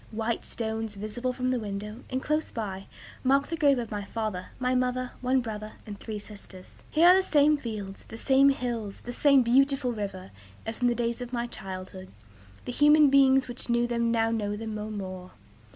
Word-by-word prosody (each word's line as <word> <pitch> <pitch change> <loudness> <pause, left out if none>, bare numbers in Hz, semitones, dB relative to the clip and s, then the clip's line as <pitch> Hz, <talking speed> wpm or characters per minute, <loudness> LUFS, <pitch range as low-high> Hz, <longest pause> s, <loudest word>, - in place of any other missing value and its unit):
White 225 +1 -3
stones, 220 -1 -4
visible 215 +5 -3
from 255 0 -1
the 255 - 0
window, 210 +2 -6
and 260 0 -2
close 305 +1 0
by, 195 -4 -5 0.4
mark 275 +2 +3
the 330 - -1
grave 285 -5 +4
of 235 -2 -4
my 205 -1 -3
father, 210 -3 -4
my 255 0 0
mother, 255 0 0
one 255 +1 +2
brother, 215 -2 -6
and 205 -2 -8
three 220 -2 -5
sisters. 200 -3 -11 0.2
Here 330 +3 +6
are 365 - +8
the 380 - +4
same 300 -4 +4
fields, 215 -8 -6
the 225 - -9
same 270 +3 +5
hills, 235 -6 -3
the 245 - -6
same 275 0 +5
beautiful 265 +1 +3
river, 195 -4 -5 0.3
as 225 +2 -5
in 245 - +4
the 240 - +2
days 235 0 -2
of 245 -1 -6
my 240 -1 -1
childhood. 190 -4 -8 0.6
The - - -3
human 295 +2 +6
beings 270 -1 +5
which 245 0 -3
knew 235 0 +3
them 235 -1 0
now 225 -1 +2
know 205 -2 -1
them 220 0 -5
no 210 0 -4
more. 185 -3 -6
235 Hz, 200 wpm, -28 LUFS, 210-255 Hz, 0.6 s, are